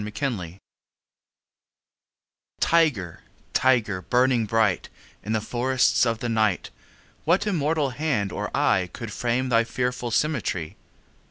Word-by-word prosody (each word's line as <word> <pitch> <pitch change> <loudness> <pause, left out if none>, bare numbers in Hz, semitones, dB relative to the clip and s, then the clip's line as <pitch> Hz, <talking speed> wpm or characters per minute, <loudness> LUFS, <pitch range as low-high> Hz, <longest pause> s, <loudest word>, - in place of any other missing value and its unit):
The 105 - -4
Tiger 105 - -4 2.0
TIGER, 140 - +2 0.3
tiger, 115 -8 +2
burning 125 0 +2
bright 110 -3 +1 0.3
In 110 - -2
the 110 - +2
forests 125 +2 +2
of 115 -1 0
the 120 - -4
night, 110 -4 0 0.5
What 170 +6 +2
immortal 155 -7 0
hand 125 - -1
or - - -3
eye 90 -1 +2
Could 115 -3 -7
frame 125 +2 -1
thy 115 -1 +4
fearful 125 +1 -2
symmetry? 110 - -1
120 Hz, 115 wpm, -24 LUFS, 105-130 Hz, 2.0 s, thy